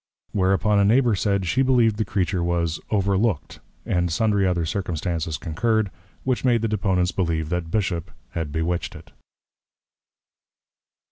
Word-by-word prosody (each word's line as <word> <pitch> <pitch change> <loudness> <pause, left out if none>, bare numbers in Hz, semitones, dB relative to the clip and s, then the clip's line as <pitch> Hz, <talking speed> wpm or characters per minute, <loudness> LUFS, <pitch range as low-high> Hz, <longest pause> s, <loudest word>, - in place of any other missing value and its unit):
Whereupon 95 +1 +2
a - - +5
Neighbour 120 +3 +4
said, 100 0 0
she 90 +10 +1
believed 120 -5 +3
the 110 - 0
Creature 95 -2 -1
was 85 -2 0
Over 100 -2 +1
looked; 110 -8 -1 0.3
and 90 -1 0
sundry 100 +1 +2
other 85 -2 0
Circumstances 85 -2 -2
concurred, 110 +4 0 0.3
which 130 -2 0
made 120 -3 +2
the - - +2
Deponents 95 -4 +1
believe 80 -4 -1
that 90 -1 -2
Bishop 90 -3 -1 0.2
had 80 -3 -3
bewitched 80 +2 -2
it. - - -13
95 Hz, 140 wpm, -23 LUFS, 85-105 Hz, 0.3 s, a